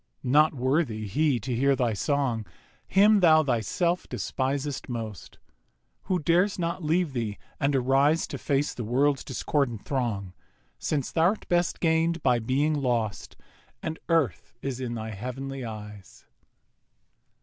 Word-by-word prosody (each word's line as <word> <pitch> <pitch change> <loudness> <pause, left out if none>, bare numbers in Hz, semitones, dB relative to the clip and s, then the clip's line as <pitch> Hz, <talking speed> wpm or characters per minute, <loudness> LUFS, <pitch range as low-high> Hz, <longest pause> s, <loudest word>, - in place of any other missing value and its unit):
Not 150 +4 +4
worthy 130 -4 0
he 140 +5 +1
to 125 +2 -2
hear 140 +3 +3
thy 120 -3 0
song, 130 -1 0 0.4
Him 205 +2 +5
thou 160 -4 +6
thyself 145 - 0
despisest 135 +5 -2
most, 110 -7 -6 0.7
Who 185 - +1
dares 175 +5 +2
not 170 0 -2
leave 160 -1 +1
thee 115 -5 -3 0.2
and 140 0 +1
arise 135 +5 +3
To - - -5
face 140 0 0
the 120 - -5
World's 135 +5 +1
discordant 130 -4 -1
throng; 110 -9 -2 0.5
Since 140 -4 -1
thou'rt 175 +6 +1
best 175 0 +1
gain'd 165 0 +1
by 125 -2 +3
being 135 +7 +1
lost, 120 -7 -2 0.5
And 160 0 -4
Earth 145 - 0
is 135 -2 -3
in 120 -2 -3
thy 110 -1 -5
Heav'nly 130 +5 -5
eyes. 105 -4 -9
135 Hz, 135 wpm, -27 LUFS, 120-155 Hz, 0.7 s, thou